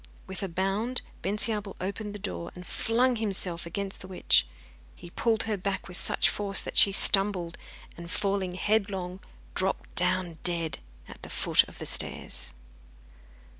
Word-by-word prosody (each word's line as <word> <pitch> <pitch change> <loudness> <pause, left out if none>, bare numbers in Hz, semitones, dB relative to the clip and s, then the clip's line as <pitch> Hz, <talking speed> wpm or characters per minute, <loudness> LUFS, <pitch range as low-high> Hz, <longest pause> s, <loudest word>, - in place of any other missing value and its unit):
With 190 -2 -4
a 195 - -1
bound 195 +8 0 0.2
Bensiabel 210 0 -1
opened 205 +2 -4
his 205 - -9
door 170 -4 -4
and 180 0 -9
flung 245 +5 +1
himself 190 -6 0
against 195 +3 -4
the 185 - -8
witch. 185 - +4 0.5
He 175 - -11
pulled 225 +2 +1
her 220 -2 -1
back 190 +1 -3
with 180 - -4
such - - +3
force 200 -1 +3
that - - -6
she 200 - +8
stumbled, 195 -4 +3 0.4
and 170 0 -9
falling 195 -2 0
headlong, 195 -2 0 0.3
dropped - - -1
down 175 -3 0
dead 165 -5 -1 0.3
at - - -12
the - - -8
foot - - +4
of - - -13
the - - -5
stairs. 65 0 -2
195 Hz, 155 wpm, -28 LUFS, 180-210 Hz, 0.5 s, she